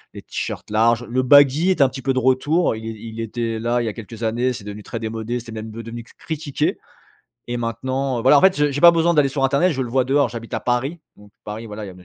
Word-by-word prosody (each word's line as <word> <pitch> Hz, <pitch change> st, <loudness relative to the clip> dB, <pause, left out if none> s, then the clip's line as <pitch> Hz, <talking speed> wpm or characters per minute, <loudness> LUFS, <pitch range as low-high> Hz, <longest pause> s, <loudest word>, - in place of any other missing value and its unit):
les -, -, -9 dB
T-shirts -, -, -5 dB
larges. 115 Hz, +2 st, +3 dB
Le 130 Hz, +2 st, 0 dB
baggy 145 Hz, +6 st, +5 dB
est 185 Hz, -, +2 dB
un 135 Hz, -, +5 dB
petit 130 Hz, +1 st, -8 dB
peu 135 Hz, +1 st, 0 dB
de 130 Hz, -, +1 dB
retour 130 Hz, +4 st, +2 dB
il 110 Hz, 0 st, -7 dB
é -, -, -3 dB
il 110 Hz, +1 st, -8 dB
était 115 Hz, 0 st, -3 dB
là 120 Hz, +1 st, 0 dB
il -, -, -3 dB
y -, -, -2 dB
a 110 Hz, -, -3 dB
quelques 115 Hz, +1 st, -9 dB
années 120 Hz, +3 st, 0 dB
c'est 120 Hz, -4 st, -7 dB
devenu 105 Hz, +1 st, -8 dB
très 115 Hz, -, -6 dB
démodé 115 Hz, +2 st, -4 dB
c'était 115 Hz, -1 st, -11 dB
même 110 Hz, 0 st, -7 dB
ve 115 Hz, +1 st, -8 dB
devenu 115 Hz, +1 st, -7 dB
critiqué. 155 Hz, -3 st, -3 dB, 0.7 s
Et 120 Hz, -, -2 dB
maintenant, 130 Hz, +3 st, -2 dB
heu, -, -, -6 dB
voilà 140 Hz, +3 st, +6 dB
en -, -, +3 dB
fait 190 Hz, +3 st, +5 dB
je 145 Hz, 0 st, +2 dB
j'ai 145 Hz, -, -3 dB
pas 170 Hz, +1 st, +9 dB
besoin 170 Hz, +1 st, +2 dB
d'aller 145 Hz, -3 st, +4 dB
sur 135 Hz, 0 st, -3 dB
internet 140 Hz, +6 st, +3 dB
je 130 Hz, -2 st, -2 dB
le 120 Hz, -, -5 dB
vois 130 Hz, +1 st, +2 dB
dehors. 140 Hz, +2 st, +2 dB
J'habite 115 Hz, -1 st, -7 dB
à -, -, -2 dB
Paris, 130 Hz, +7 st, -1 dB, 0.2 s
donc 105 Hz, 0 st, -18 dB
Paris 110 Hz, +2 st, -7 dB
voilà 105 Hz, 0 st, -7 dB
il -, -, -8 dB
y -, -, -8 dB
a -, -, -11 dB
n 90 Hz, 0 st, -16 dB
120 Hz, 285 wpm, -21 LUFS, 115-140 Hz, 0.7 s, pas